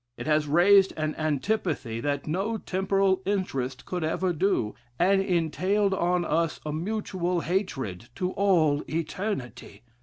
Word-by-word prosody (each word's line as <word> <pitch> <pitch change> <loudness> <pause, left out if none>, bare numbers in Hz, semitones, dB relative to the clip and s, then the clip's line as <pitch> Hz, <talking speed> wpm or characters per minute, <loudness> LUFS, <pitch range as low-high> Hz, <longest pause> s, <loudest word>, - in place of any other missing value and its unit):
It - - -6
has 150 -1 +2
raised 190 +6 +5
an 155 0 -1
antipathy, 155 - -1
that 140 +2 -2
no 195 +8 -1
temporal 190 -1 +1
interest 180 -10 -2
could 180 -2 -3
ever 175 +3 0
do, 160 - 0 0.2
and 195 +2 +3
entailed 190 +3 +1
on 175 -1 +1
us 165 0 0
a 150 - -3
mutual 180 -1 -2
hatred 135 - -3
to 180 +4 -1
all 165 -8 +2
eternity. 165 - -4
175 Hz, 130 wpm, -27 LUFS, 150-195 Hz, 0.2 s, raised